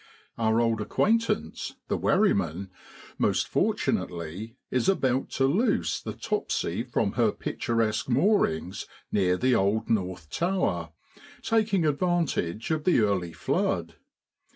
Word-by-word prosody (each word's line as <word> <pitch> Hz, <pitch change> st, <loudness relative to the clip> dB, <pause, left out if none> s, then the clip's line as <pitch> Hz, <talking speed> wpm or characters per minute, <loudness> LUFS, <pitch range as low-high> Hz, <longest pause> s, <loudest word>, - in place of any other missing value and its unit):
Our 110 Hz, 0 st, +2 dB
old 115 Hz, -2 st, +1 dB
acquaintance, 230 Hz, -, 0 dB
the -, -, 0 dB
wherryman, 95 Hz, -, +1 dB, 0.5 s
most -, -, +1 dB
fortunately, 90 Hz, +7 st, -1 dB, 0.2 s
is 125 Hz, +4 st, +2 dB
about 130 Hz, -8 st, +1 dB
to 135 Hz, -, +3 dB
loose 205 Hz, -, +1 dB
the -, -, -5 dB
lopsy -, -, -2 dB
from -, -, 0 dB
her -, -, +2 dB
picturesque 115 Hz, 0 st, -1 dB
moorings 120 Hz, -, +1 dB, 0.2 s
near 90 Hz, -2 st, +2 dB
the 130 Hz, +4 st, +2 dB
old 110 Hz, +1 st, +1 dB
North 90 Hz, -7 st, -2 dB
Tower, 165 Hz, -, 0 dB, 0.5 s
taking 215 Hz, -6 st, +2 dB
advantage 150 Hz, -, 0 dB
of 155 Hz, -1 st, 0 dB
the 180 Hz, -, +3 dB
early 95 Hz, -5 st, 0 dB
flood. -, -, -1 dB
115 Hz, 115 wpm, -27 LUFS, -, 0.5 s, to